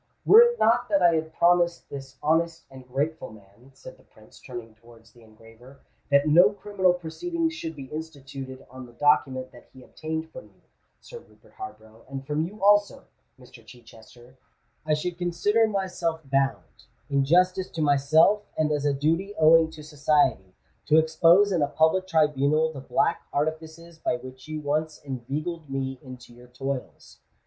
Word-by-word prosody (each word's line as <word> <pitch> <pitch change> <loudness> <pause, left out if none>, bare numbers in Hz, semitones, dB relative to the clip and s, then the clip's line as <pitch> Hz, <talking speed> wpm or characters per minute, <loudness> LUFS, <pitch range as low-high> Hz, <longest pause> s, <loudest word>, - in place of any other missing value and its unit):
"Were 445 - +9
it 475 0 +3
not - - +2
that 295 - +2
I 170 -1 +5
had 160 0 -2
promised 175 0 +2
this 135 -1 -10
honest 165 +2 0
and 130 -1 -13
grateful 145 +4 -3
man," 105 +4 -19
said 130 - -13
the - - -22
Prince, 110 0 -20
turning 120 -3 -9
towards 115 0 -20
the 120 - -21
engraver, 115 +4 -18 0.3
"that 140 +1 +3
no 175 +6 +6
criminal 200 -3 0
proceedings 325 - -3
should 165 - -6
be 140 - -8
instituted 135 -3 -9
on 130 -1 -10
the 120 - -18
document 130 -1 +1
that 120 - -17
he 130 - -15
obtained 160 +2 -6
from 260 - -11
you, - - -25 0.4
Sir 480 - -11
Rupert - - -24
Harborough, 115 - -11
and 135 0 -7
from 150 +2 -1
you 205 +2 -12
also, 205 0 +3 0.3
Mr. - - -16
Chichester, 120 +2 -17 0.5
I 155 - +3
should 170 +3 -5
consider 205 +6 +1
myself 185 -5 -3
bound, 135 - -2 0.2
in 140 -2 +1
justice 180 +5 +2
to 165 - -5
myself 150 +8 +3 0.2
and 155 -1 +1
as 145 -1 -1
a 145 -1 +1
duty 165 +8 -1
owing 160 +1 +5
to 160 -1 -12
society, 145 - 0 0.3
to 155 - +4
expose 165 +5 +4
in 175 -4 +1
a 145 - +2
public 160 +5 +1
tribunal 155 -1 +1
the 135 - -8
black 165 +5 -1
artifices 160 +2 -4
by 160 - -1
which 130 -2 -12
you 155 0 -5
once 155 +2 -2
inveigled 145 +5 -5
me 135 -1 -4
into 125 -3 -12
your 120 +1 -16
toils. 135 +1 -7
150 Hz, 170 wpm, -25 LUFS, 130-170 Hz, 0.5 s, Were